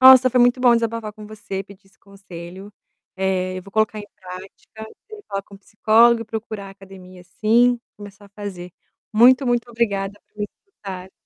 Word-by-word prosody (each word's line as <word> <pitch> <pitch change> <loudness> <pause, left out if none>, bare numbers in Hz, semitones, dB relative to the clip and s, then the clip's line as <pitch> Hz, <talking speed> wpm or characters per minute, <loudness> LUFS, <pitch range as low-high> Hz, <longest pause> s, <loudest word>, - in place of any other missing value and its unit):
Nossa, 260 0 +9
foi 250 0 +2
muito 245 +1 +4
bom 245 -1 +6
desabafar 230 -2 -2
com 215 0 -12
você, 205 -2 -6
pedir 195 0 -17
esse 195 - -28
conselho, 190 0 -11 0.4
eh, 185 -1 -1
eu - - -9
vou 195 - -14
colocar 215 +1 +1
em 205 - -10
prática, 190 +3 -11 0.4
falar 195 0 -3
com 200 0 -15
psicólogo 225 +3 +4
e - - -11
procurar 215 -2 -6
a - - -10
academia 190 -2 -14
sim, 235 +6 +3 0.2
começar 205 0 -12
a - - -20
fazer. 195 -4 -8 0.4
Muito, 255 +5 +6
muito 240 -1 0
obrigada 205 -4 -1
por - - -43
me - - +1 0.2
escutar. 190 - -9
205 Hz, 175 wpm, -21 LUFS, 195-230 Hz, 0.4 s, Nossa